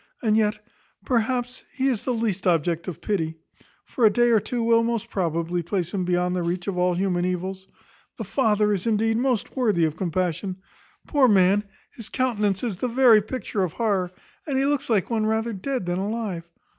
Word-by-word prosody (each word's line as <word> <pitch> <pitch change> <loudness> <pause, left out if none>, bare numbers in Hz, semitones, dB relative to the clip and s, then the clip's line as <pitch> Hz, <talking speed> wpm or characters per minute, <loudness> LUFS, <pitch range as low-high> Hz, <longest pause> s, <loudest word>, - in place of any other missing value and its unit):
And 215 -2 +3
yet, 215 -1 +2 0.5
perhaps, 245 +1 -1
he 270 -1 -1
is 250 -4 -1
least 225 -6 -1
the - - +5
object 170 +1 0
of 175 -2 -6
pity; 165 -6 -1 0.5
for 245 - -3
a 220 - +8
day 240 +3 +3
or 225 - +5
two 240 +3 -3
will, 230 0 +4
most 230 -2 -2
probably, 170 -1 -1
place 175 0 -3
him 185 -3 -1
beyond 180 0 +1
the 180 - -1
reach 175 +1 -2
of 200 - -1
all 180 0 +1
human 180 -1 0
evils. 185 +1 -3 0.5
The - - -4
father 210 -5 +2
is, 195 +2 -2
indeed, 225 0 +2
most 245 -3 -1
worthy 210 -10 +2
of 155 -1 -2
compassion. 185 +1 -2 0.5
Poor 285 -4 +3
man, 200 0 +4 0.3
his 230 -3 -9
countenance 210 -6 0
is 220 -7 -2
the 250 - -1
very 240 -3 +5
picture 220 -1 -4
of 180 -4 -1
horror, 200 -6 0 0.4
and 275 -3 0
he 270 - +2
looks 285 -2 0
like 215 -1 +1
one 220 -2 +1
rather 220 +1 0
dead 250 +2 -3
than 175 +1 -1
alive. 200 -5 -3
205 Hz, 195 wpm, -24 LUFS, 180-235 Hz, 0.5 s, a